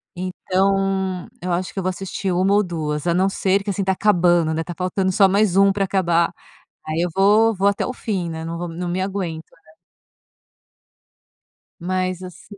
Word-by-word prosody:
Então, 190 0 -1
eu 180 - -3
acho 175 +1 -2
que 195 - -3
eu - - -3
vou 185 - 0
assistir 190 +1 -4
1 185 +3 +2
ou 205 +1 +4
2, 155 -4 -3
a 170 - +2
não 185 +2 +2
ser 195 0 +1
que, 205 - -5
assim, 195 0 -1
tá 190 - +1
acabando, 175 -5 +3
né, 160 +1 -1
tá 175 - -7
faltando 185 +1 0
só 195 +1 +5
mais 195 -1 +2
1 195 0 +5
pra 200 -1 0
acabar. 175 -3 +1 0.6
Aí, 155 +2 -1
eu 175 - 0
vou 210 +4 +4
vou 195 +2 +2
até 200 - +1
o 255 - -4
fim, 190 -9 -3
né. 160 0 -5
Não 165 0 -4
vou 175 0 -4
m 165 - -9
não 180 0 -3
me 180 +2 -1
aguento, 185 -5 -3
né? 160 -1 -24 2.1
Mas, 185 0 -2
assi 185 +3 -11
185 Hz, 200 wpm, -21 LUFS, 175-195 Hz, 2.1 s, só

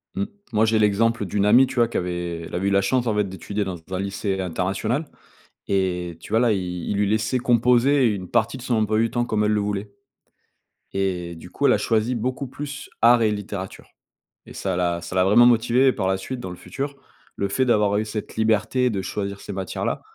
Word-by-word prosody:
Mmh, 200 - 0 0.3
moi 110 0 +3
j'ai 110 0 +2
l'exemple 105 +1 +2
d'une 100 +2 0
amie, 120 +5 +6
tu 130 - -8
vois, 120 -2 +4
qui - - -3
avait 85 -1 -3
elle - - -9
avait 95 +2 -1
eu - - +1
la 100 0 +4
chance 125 +2 +1
en 105 - +1
fait 105 - +2
d'étudier 100 +3 -4
dans 95 -2 -4
un 95 - -2
lycée 100 0 -2
international 95 - -1 0.6
et 90 -3 -1
tu - - -11
vois 110 - +4
là, 120 -3 +3
ils 90 -3 -3
ils 100 - 0
lui 105 0 +2
laissaient 110 +4 +1
composer 125 +3 +3
une 95 -5 -2
partie 110 +4 +1
de 125 - -10
son 125 -2 -1
emploi 110 0 +1
du 115 0 +2
temps 120 0 0
comme 105 -3 0
elle 105 - +2
le 105 - +2
voulait 100 0 -3 1.0
et 90 -3 -2
du 80 - -11
coup, - - -2
elle - - +5
a - - +3
choisi 115 +2 0
beaucoup 130 +4 -3
plus 145 +2 -7
art 120 0 +6
et 105 - +3
littérature 100 -2 -6 0.6
et - - -12
ça 95 -2 -2
l'a 85 -1 0
ça 85 - -7
l'a 90 - +4
vraiment 115 +5 +6
motivée 120 +3 +4
et - - +4
par 95 -3 -2
la 95 - +2
suite 120 +6 -6
dans 95 - -6
le 90 - -7
futur, 140 +12 -5 0.4
le 100 - -1
fait 130 +6 +1
d'avoir 105 -3 +3
eu 110 - 0
cette 105 0 -6
liberté 110 +3 +2
de 100 -4 -2
choisir 100 +1 -4
ces 100 - -7
matières-là, 95 -2 -3
105 Hz, 230 wpm, -23 LUFS, 95-120 Hz, 1.0 s, amie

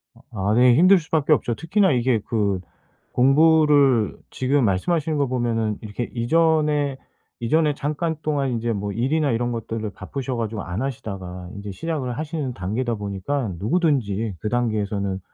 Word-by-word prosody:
아 - - -19
아 100 -1 -1
네 125 0 +6
힘들 185 +5 +6
수밖에 155 -1 +1
없죠. 120 -3 0
특히나 190 +2 +2
이게 125 -2 +2
그 100 -4 0 0.5
공부를 145 -3 +4
지금 130 0 +1
말씀하시는 150 - 0
거 140 -2 +1
보면은 115 -4 -1
이렇게 110 +2 -5
이전에 150 +1 +2 0.4
이전에 150 +5 +2
잠깐 155 +3 -2
동안 140 -4 0
인제 115 0 -1
뭐 100 0 -3
일이나 140 +6 +1
이런 120 +1 0
것들을 115 -1 -4
바쁘셔 130 +7 -5
가지고 110 -2 -3
안 90 +6 -4
하시다가 95 -8 -5
인제 100 0 -6
시작을 130 - -3
하시는 150 -4 -3
단계다 115 +6 -2
보니까 105 +4 -3
누구든지 115 - 0
그 105 - -3
단계에서는 105 -5 -1
120 Hz, 350 characters per minute, -23 LUFS, 105-150 Hz, 0.5 s, 네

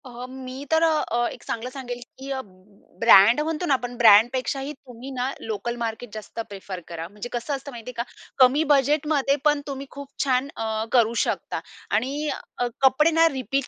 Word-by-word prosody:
अ, 245 -1 -8
मी 260 +1 -8
तर 320 +1 +4
अ, 300 -7 +2
एक - - -11
चांगलं 230 +2 -4
सांगेल, 250 -2 -6 0.2
की 270 +1 -8
अ, 265 - -2 0.6
ब्रँड 230 +3 +7
म्हणतो 320 +3 -2
ना 290 - +3
आपण, 245 -2 -2
ब्रँडपेक्षाही 245 +5 +4
तुम्ही 255 -1 -11
ना, 255 0 -2
लोकल 225 +2 -3
मार्केट 230 -1 -4
जास्त 215 +1 -8
प्रिफर 195 -2 -7
करा. 165 -1 -6
म्हणजे 210 +5 -8
कसं 245 +4 -2
असतं 275 +1 -8
माहितीये 240 0 -8
का? 235 - 0 0.3
कमी 265 +4 +5
बजेटमध्ये 285 0 +3
पण 295 -1 +3
तुम्ही 275 -1 -5
खूप 280 0 -8 0.2
छान 260 -1 +1
अ, 220 -1 -2
करू 235 -2 +4
शकता - - -3 0.4
आणि 280 +7 -1 0.3
अ, 245 - 0
कपडे 270 +4 +5
ना 330 +1 +5
रिपीट 270 +1 -2
255 Hz, 175 wpm, -24 LUFS, 235-280 Hz, 0.6 s, ब्रँड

